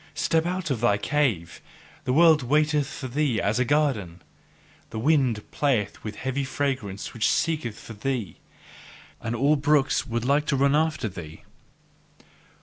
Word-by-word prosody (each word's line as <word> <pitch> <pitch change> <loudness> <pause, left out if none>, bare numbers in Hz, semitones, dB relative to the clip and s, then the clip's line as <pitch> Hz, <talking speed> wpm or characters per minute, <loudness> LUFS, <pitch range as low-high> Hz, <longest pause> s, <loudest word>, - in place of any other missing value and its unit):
Step 165 +1 +1
out 180 -3 -2
of 120 -4 -1
thy 105 -4 +3
cave: 115 - -1 0.4
the - - 0
world 160 +1 +6
waiteth 150 +2 +2
for 135 - -6
thee 130 -3 0
as 105 +4 0
a - - +4
garden. 120 - 0 0.7
The 110 - -7
wind 125 -4 +2
playeth 130 -8 0
with 105 -1 -5
heavy 130 +1 -2
fragrance 130 -8 -3
which 115 -2 +1
seeketh 155 -10 -1
for 115 - -10
thee; 110 -5 -3 0.8
and 115 0 -3
all 140 +5 +3
brooks 145 -1 +2
would 120 -1 -2
like 145 +3 +2
to 140 - +1
run 140 +1 +3
after 155 -6 +1
thee. 85 -5 -9
135 Hz, 150 wpm, -25 LUFS, 110-150 Hz, 0.8 s, world